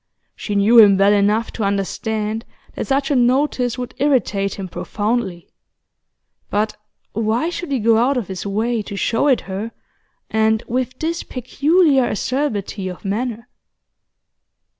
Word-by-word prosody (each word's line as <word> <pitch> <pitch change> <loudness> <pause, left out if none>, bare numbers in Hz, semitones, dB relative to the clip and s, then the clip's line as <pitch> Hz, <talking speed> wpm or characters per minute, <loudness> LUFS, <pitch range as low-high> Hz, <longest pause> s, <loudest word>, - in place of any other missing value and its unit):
She 205 - -4
knew 215 +4 +6
him 200 -3 +7
well 200 +1 +5
enough 210 +3 +2
to 220 - -4
understand 210 +2 -2 0.3
that - - -4
such 275 +1 0
a - - +3
notice 250 0 +2
would 250 -1 -5
irritate 230 -8 +1
him 195 -2 -6
profoundly; 205 -2 -3 1.0
but 210 +1 0 0.4
why 225 +9 0
should 350 -3 -5
he 270 - +2
go 225 -1 +3
out 260 +3 +2
of 230 -7 -2
his 190 -2 -5
way 220 +3 -1
to 200 - -7
show 225 +6 +1
it 265 -4 +3
her, 200 +4 -5 0.6
and 220 0 +2
with 255 +1 -2
this 330 +3 -2
peculiar 280 +2 +2
acerbity 215 -5 -2
of 180 +2 -8
manner? 230 +3 -3
225 Hz, 140 wpm, -20 LUFS, 205-255 Hz, 1.0 s, him